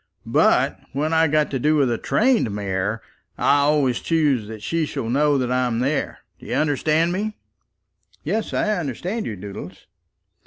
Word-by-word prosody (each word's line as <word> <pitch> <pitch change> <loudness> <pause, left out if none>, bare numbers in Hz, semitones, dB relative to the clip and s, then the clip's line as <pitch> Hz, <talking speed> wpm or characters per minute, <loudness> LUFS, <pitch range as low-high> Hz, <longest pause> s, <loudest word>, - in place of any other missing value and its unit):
But - - +2
when 150 +4 -1
I've 160 -1 +3
got 150 -1 +2
to 135 - -1
do 150 +4 +2
with 140 -5 +2
a 115 - 0
trained 240 - +2
mare, 100 +2 -2 0.3
I 145 - +3
always 140 -4 +2
choose 145 -9 +1
that 110 -1 -9
she 165 -2 -1
shall 115 -4 -4
know 145 +2 +3
that 125 -2 -1
I'm 125 -2 +1
there! 135 +5 -1 0.2
Do - - -13
you - - -2
understand 155 +3 +1
me?" 210 +4 -3 0.9
"Yes; 220 +1 -2
I 215 -1 0
understand 175 - -3
you, 110 - -4
Doodles." 100 +1 -9
145 Hz, 165 wpm, -22 LUFS, 120-160 Hz, 0.9 s, I've